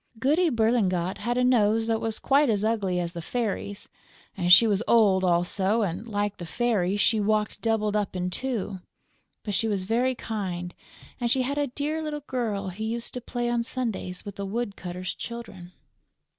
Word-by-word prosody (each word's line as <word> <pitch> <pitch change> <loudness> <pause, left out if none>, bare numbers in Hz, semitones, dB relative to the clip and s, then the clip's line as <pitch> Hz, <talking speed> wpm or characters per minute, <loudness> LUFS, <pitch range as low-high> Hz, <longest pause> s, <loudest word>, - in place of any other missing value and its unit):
Goody 305 +9 +3
Berlingot 215 - +1
had 240 +3 -1
a 250 - +3
nose 225 -3 +3
that 225 -1 0
was 225 -1 -2
quite 280 0 +3
as 210 -1 +1
ugly 200 -5 0
as 170 -1 -3
the 170 - -5
Fairy's; 205 0 -3 0.6
she 180 +6 +9
was 210 -2 +2
old 200 -5 +5
also; 190 +5 +2
and, 200 +4 -3
like 205 -2 -2
the 175 - -7
Fairy, 205 -3 0
she 220 +1 +3
walked 210 0 0
doubled 215 -2 +1
up 205 -2 -1
in 180 0 -2
two; 215 -4 -3 0.6
but 205 - -3
she 225 +4 +1
was 200 -3 -1
very 245 +6 +1
kind 180 -7 -4 0.5
and 240 -1 0
she 260 +2 +3
had 280 +3 -2
a 290 - +1
dear 295 +5 -2
little 300 -1 -4
girl 215 -7 -2
who 195 +4 -6
used 230 +1 -3
to 250 - -4
play 240 0 -3
on 240 0 +1
Sundays 230 -7 -3
with 200 -1 -8
the 200 - -3
woodcutter's 190 -5 -4
Children. 210 -7 -8
215 Hz, 180 wpm, -26 LUFS, 190-240 Hz, 0.6 s, she